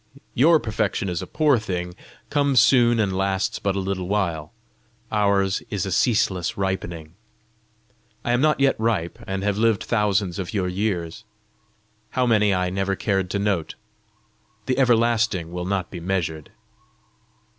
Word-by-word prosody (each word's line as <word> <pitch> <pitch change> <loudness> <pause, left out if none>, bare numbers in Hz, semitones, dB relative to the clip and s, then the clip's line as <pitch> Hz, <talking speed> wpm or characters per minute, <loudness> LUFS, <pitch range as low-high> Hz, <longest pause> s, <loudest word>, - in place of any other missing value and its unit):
Your 160 +6 +5
perfection 105 -4 -2
is 85 -2 -3
a - - -7
poor 150 -5 +2
thing, 90 -4 -4 0.4
comes 140 -3 +3
soon, 120 0 +4
and 100 -3 0
lasts 95 +1 -1
but 100 -1 -1
a - - -1
little 95 -1 -3
while; 85 -7 -1 0.6
ours 100 -2 +1
is 100 -2 -2
a 95 - -4
ceaseless 95 -4 +1
ripening. 85 -5 -3 1.1
I 120 - +1
am 120 +1 +2
not 150 -1 +2
yet 135 -1 +3
ripe, 110 -3 -1
and 95 0 -3
have 105 0 0
lived 115 -2 +2
thousands 100 -5 0
of 95 +3 -5
your 95 -2 0
years 90 -1 -3 0.9
how 130 - 0
many, 105 -3 +3
I 90 -1 0
never 95 +1 -1
cared 95 -2 -1
to 100 - -1
note. 100 -5 -1 0.9
The 130 +1 0
everlasting 115 -8 +2
will 90 0 -4
not 95 -2 -2
be 90 - -6
measured. 85 -4 -3
100 Hz, 150 wpm, -23 LUFS, 90-115 Hz, 1.1 s, Your